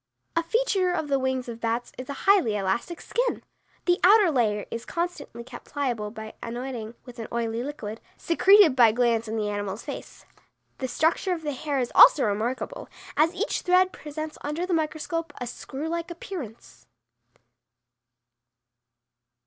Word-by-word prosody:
A 335 Hz, -, +3 dB
feature 380 Hz, 0 st, +1 dB
of 315 Hz, -4 st, -2 dB
the 275 Hz, -1 st, +2 dB
wings 260 Hz, -1 st, -1 dB
of 230 Hz, -1 st, -7 dB
bats, 230 Hz, +1 st, -1 dB
is 255 Hz, +1 st, -8 dB
a -, -, -2 dB
highly 385 Hz, -, +4 dB
elastic 205 Hz, -, -1 dB
skin. -, -, -1 dB, 0.4 s
The 355 Hz, 0 st, +3 dB
outer 400 Hz, -1 st, +7 dB
layer 215 Hz, -6 st, +1 dB
is 230 Hz, 0 st, -4 dB
constantly 335 Hz, -9 st, -4 dB
kept 240 Hz, 0 st, -11 dB
pliable 245 Hz, -7 st, -2 dB
by 220 Hz, 0 st, -8 dB
anointing 240 Hz, -1 st, -5 dB
with 245 Hz, -2 st, -11 dB
an 225 Hz, -, -5 dB
oily 230 Hz, 0 st, -1 dB
liquid, 240 Hz, -6 st, -6 dB, 0.2 s
secreted 370 Hz, -2 st, +5 dB
by 235 Hz, -4 st, +6 dB
glands 230 Hz, -1 st, +1 dB
in 220 Hz, -, -3 dB
the 215 Hz, -2 st, -1 dB
animal's 205 Hz, +1 st, -4 dB
face. -, -, -8 dB, 0.5 s
The 260 Hz, -, -2 dB
structure 330 Hz, +7 st, +1 dB
of 330 Hz, -2 st, -5 dB
the 295 Hz, -, -1 dB
hair 285 Hz, +1 st, -3 dB
is 245 Hz, -2 st, -1 dB
also 285 Hz, -, +8 dB
remarkable, 220 Hz, +4 st, -2 dB, 0.3 s
as 325 Hz, +4 st, +3 dB
each 415 Hz, +6 st, -1 dB
thread 365 Hz, 0 st, +3 dB
presents 310 Hz, +1 st, -7 dB
under 300 Hz, +5 st, -2 dB
the 365 Hz, -, -2 dB
microscope 320 Hz, +1 st, -2 dB
a 250 Hz, -, -3 dB
screw 270 Hz, +5 st, -6 dB
like 335 Hz, +1 st, -3 dB
appearance. 230 Hz, -, -8 dB
265 Hz, 155 wpm, -26 LUFS, 230-335 Hz, 0.5 s, also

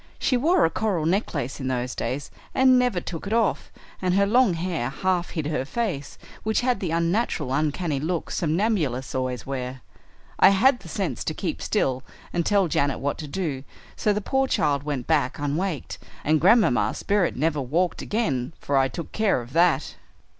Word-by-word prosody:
She 255 Hz, -, +1 dB
wore 325 Hz, +8 st, +3 dB
a 165 Hz, -, +1 dB
coral 195 Hz, -8 st, -1 dB
necklace 160 Hz, -, -1 dB
in 130 Hz, -, -3 dB
those 125 Hz, -1 st, -2 dB
days, 140 Hz, +3 st, -4 dB, 0.2 s
and 260 Hz, -1 st, +6 dB
never 245 Hz, -7 st, +1 dB
took 170 Hz, +2 st, -6 dB
it 210 Hz, -, -2 dB
off, 230 Hz, -3 st, +1 dB, 0.3 s
and 185 Hz, -1 st, +1 dB
her 200 Hz, 0 st, +4 dB
long 225 Hz, -2 st, +4 dB
hair 165 Hz, -7 st, -2 dB
half 180 Hz, +4 st, -1 dB
hid 160 Hz, -4 st, -3 dB
her 150 Hz, -3 st, -1 dB
face, 150 Hz, -, -3 dB, 0.2 s
which 220 Hz, +2 st, 0 dB
had 250 Hz, 0 st, +1 dB
the 180 Hz, -, -2 dB
unnatural, 165 Hz, -, 0 dB
uncanny 150 Hz, +1 st, 0 dB
look 165 Hz, +3 st, -2 dB
somnambulists 160 Hz, -, 0 dB
always 130 Hz, -1 st, -2 dB
wear. 130 Hz, -1 st, -5 dB, 0.6 s
I -, -, +8 dB
had 245 Hz, +7 st, +4 dB
the -, -, -12 dB
sense -, -, -2 dB
to -, -, -2 dB
keep -, -, -3 dB
still 130 Hz, -11 st, 0 dB, 0.3 s
and 170 Hz, -, +1 dB
tell 200 Hz, -3 st, +3 dB
Janet 140 Hz, -3 st, 0 dB
what 140 Hz, +1 st, -2 dB
to 150 Hz, -, -5 dB
do, 145 Hz, -4 st, -3 dB, 0.3 s
so 210 Hz, -, +1 dB
the 210 Hz, +1 st, 0 dB
poor 265 Hz, +5 st, +1 dB
child 145 Hz, -, +1 dB
went 140 Hz, -4 st, -3 dB
back 145 Hz, -5 st, +1 dB
unwaked, 150 Hz, +3 st, -2 dB, 0.2 s
and 155 Hz, 0 st, +2 dB
Grandmamma's 160 Hz, -, +4 dB
spirit 200 Hz, -3 st, +1 dB
never 150 Hz, +1 st, 0 dB
walked 165 Hz, +7 st, 0 dB
again 140 Hz, -, -1 dB
for 140 Hz, -, 0 dB
I 135 Hz, 0 st, +4 dB
took 160 Hz, +5 st, -7 dB
care 215 Hz, -9 st, +1 dB
of 120 Hz, +1 st, -10 dB
that." 170 Hz, 0 st, +2 dB
165 Hz, 180 wpm, -25 LUFS, 140-200 Hz, 0.6 s, I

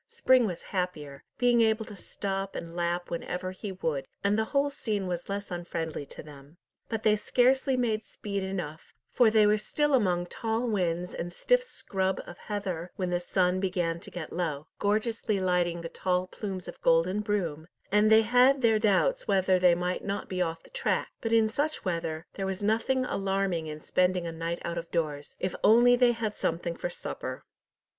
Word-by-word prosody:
Spring 260 Hz, -, +4 dB
was 175 Hz, -4 st, -5 dB
happier, 150 Hz, -7 st, -3 dB
being 245 Hz, -1 st, +4 dB
able 220 Hz, 0 st, +2 dB
to 210 Hz, -, -9 dB
stop 195 Hz, 0 st, -4 dB
and 170 Hz, 0 st, -6 dB
lap 175 Hz, 0 st, -1 dB
whenever 180 Hz, +2 st, -3 dB
he 195 Hz, +2 st, -6 dB
would, 155 Hz, -7 st, -2 dB, 0.2 s
and 200 Hz, +1 st, +3 dB
the 220 Hz, +1 st, +1 dB
whole 280 Hz, +3 st, +1 dB
scene 215 Hz, -8 st, -2 dB
was 175 Hz, 0 st, -4 dB
less 200 Hz, 0 st, -4 dB
unfriendly 165 Hz, -4 st, -4 dB
to -, -, -10 dB
them. 145 Hz, +1 st, -14 dB, 0.3 s
But 225 Hz, -2 st, -3 dB
they 215 Hz, -1 st, +5 dB
scarcely 255 Hz, +4 st, +2 dB
made 225 Hz, -3 st, 0 dB
speed 200 Hz, -1 st, -5 dB
enough, 180 Hz, -5 st, -5 dB, 0.2 s
for 245 Hz, -3 st, +5 dB
they 215 Hz, -1 st, +5 dB
were 210 Hz, +1 st, +4 dB
still 295 Hz, +7 st, 0 dB
among 180 Hz, -8 st, +2 dB
tall 225 Hz, +6 st, -2 dB
whins 180 Hz, -5 st, -1 dB
and 175 Hz, +1 st, -4 dB
stiff -, -, +2 dB
scrub 190 Hz, -, -2 dB
of 175 Hz, -, -11 dB
heather 185 Hz, -5 st, -4 dB
when 185 Hz, -2 st, -2 dB
the 175 Hz, -, +1 dB
sun 180 Hz, +1 st, +1 dB
began 175 Hz, -3 st, -1 dB
to -, -, -11 dB
get 170 Hz, -4 st, -7 dB
low, 155 Hz, -4 st, -2 dB
gorgeously 215 Hz, 0 st, 0 dB
lighting 175 Hz, -2 st, +1 dB
the 165 Hz, -, -4 dB
tall 180 Hz, +1 st, 0 dB
plumes 190 Hz, -1 st, -6 dB
of -, -, -9 dB
golden 170 Hz, +4 st, +3 dB
broom, 175 Hz, -7 st, -2 dB, 0.2 s
and 210 Hz, +1 st, +4 dB
they 220 Hz, 0 st, +7 dB
had 250 Hz, +4 st, +4 dB
their 225 Hz, -2 st, +4 dB
doubts -, -, +2 dB
whether 190 Hz, -1 st, +3 dB
they 180 Hz, -1 st, +5 dB
might 180 Hz, +1 st, -2 dB
not 200 Hz, 0 st, -3 dB
be 185 Hz, -1 st, -2 dB
off 165 Hz, -2 st, -2 dB
the -, -, -19 dB
track; -, -, 0 dB
but 225 Hz, -, -2 dB
in 225 Hz, -1 st, +5 dB
such 290 Hz, +8 st, -2 dB
weather, 165 Hz, -2 st, -2 dB
there 195 Hz, -1 st, -3 dB
was 190 Hz, +1 st, -4 dB
nothing 230 Hz, +5 st, +1 dB
alarming 195 Hz, -6 st, -1 dB
in 155 Hz, 0 st, -6 dB
spending 180 Hz, +2 st, +1 dB
a 165 Hz, -, -3 dB
night 165 Hz, +1 st, -3 dB
out 170 Hz, 0 st, -2 dB
of 170 Hz, -, -9 dB
doors, 150 Hz, -4 st, -2 dB
if 185 Hz, -, -2 dB
only 240 Hz, +3 st, +7 dB
they 245 Hz, -1 st, +4 dB
had 220 Hz, -2 st, -3 dB
something 170 Hz, +1 st, -2 dB
for 175 Hz, -, -3 dB
supper. -, -, -6 dB
190 Hz, 190 wpm, -28 LUFS, 175-220 Hz, 0.3 s, they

